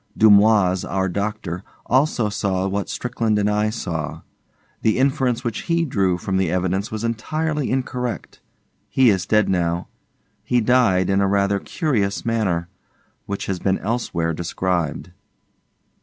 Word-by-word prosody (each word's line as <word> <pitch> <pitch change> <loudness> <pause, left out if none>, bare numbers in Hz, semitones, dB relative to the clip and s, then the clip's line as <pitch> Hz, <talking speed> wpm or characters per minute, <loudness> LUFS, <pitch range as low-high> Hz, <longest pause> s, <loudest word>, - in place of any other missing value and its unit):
Dumoise, 100 -3 +5
our 95 +1 -1
doctor, 100 -2 -3 0.2
also 130 -3 +2
saw 95 -2 -1
what 100 +1 -2
Strickland 115 +1 -1
and 105 0 +1
I 105 +1 +1
saw. 85 -9 -4 0.6
The 110 - +2
inference 130 -2 +1
which 115 -3 -3
he 170 0 +1
drew 95 - +1
from 95 +2 -2
the 95 -3 +1
evidence 95 +3 -1
was 110 0 -5
entirely 150 +6 -1
incorrect. 125 -2 -3 0.5
He 130 -4 +5
is 95 -4 -1
dead 105 -1 +3
now; 85 -2 0 0.5
he 125 - +2
died, 110 -6 +3
in 95 0 +3
a 100 - +3
rather 100 0 +2
curious 110 - -1
manner, 100 -7 0 0.6
which 100 - -3
has 95 -2 -2
been 95 +1 +1
elsewhere 95 -7 -2
described. 85 +1 -2
100 Hz, 140 wpm, -21 LUFS, 95-115 Hz, 0.6 s, Dumoise